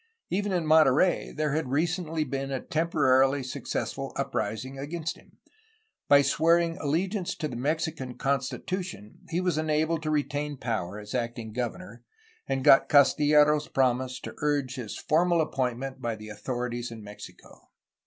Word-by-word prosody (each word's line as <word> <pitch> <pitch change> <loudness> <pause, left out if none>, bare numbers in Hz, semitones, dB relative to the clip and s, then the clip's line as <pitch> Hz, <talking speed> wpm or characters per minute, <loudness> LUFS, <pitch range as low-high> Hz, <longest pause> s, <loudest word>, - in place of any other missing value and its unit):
Even 205 +2 0
in 175 -3 0
Monterey 155 +2 +4
there 150 -1 -1
had 155 -4 -1
recently 165 +2 0
been 135 -2 -4
a 135 -1 -2
temporarily 140 -4 +2
successful 130 - -4
uprising 130 +5 -3
against 160 +3 -4
him. - - -21 0.7
By 145 0 +7
swearing 165 +4 +3
allegiance 180 +6 -1
to 155 - -3
the 125 - -7
Mexican 150 -1 -2
constitution 140 - -3
he 170 0 0
was 180 -4 0
enabled 155 +1 0
to 155 - -3
retain 145 -1 -1
power 110 -6 -3
as 105 0 -9
acting 115 -2 -3
governor, 125 +10 -5 0.4
and 135 -1 -1
got 135 - +6
Castillero's 150 +1 +5
promise 130 -1 0
to - - -7
urge 145 -3 0
his 125 -6 -6
formal 170 +2 +2
appointment 130 -3 -2
by 115 -2 -2
the 110 0 -10
authorities 120 +2 -4
in 115 -2 -9
Mexico. 105 0 -13
145 Hz, 145 wpm, -27 LUFS, 125-160 Hz, 0.7 s, By